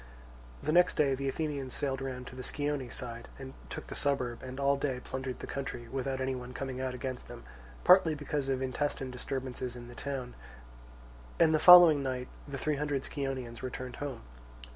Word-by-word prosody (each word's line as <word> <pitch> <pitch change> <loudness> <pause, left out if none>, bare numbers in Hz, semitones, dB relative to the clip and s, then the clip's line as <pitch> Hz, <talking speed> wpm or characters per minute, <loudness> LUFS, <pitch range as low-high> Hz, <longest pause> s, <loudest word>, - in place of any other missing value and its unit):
The 150 - +1
next 180 +2 +5
day 140 -3 +3
the 135 +1 -1
Athenians 140 -3 -3
sailed 135 -2 -1
round 130 -1 -4
to 125 - -10
the 130 - -6
Scione 145 -1 -2
side, 120 -2 -5
and 135 -1 -8 0.2
took - - -6
the - - -7
suburb, 130 -5 0
and 130 +1 -7
all 140 0 +3
day 135 -2 -1
plundered 130 0 -5
the - - -7
country, 130 -3 -5
without 135 0 -2
any 130 0 0
one 125 0 -7
coming 130 -1 -4
out 130 -1 -2
against 130 0 -5
them, - - -10 0.4
partly 180 -4 +6
because 145 -1 -2
of 130 -1 0
intestine 130 0 -2
disturbances 125 -1 -4
in 120 0 -9
the - - -10
town; 130 -1 -4 1.1
and 160 -1 +5
the 155 - +4
following 175 -5 +10
night 130 -2 -3 0.2
the 140 -1 -5
three 150 +1 0
hundred 145 -2 -1
Scionaeans 130 -4 -4
returned 130 -1 -5
home. 140 -4 -5
135 Hz, 185 wpm, -31 LUFS, 125-145 Hz, 1.1 s, following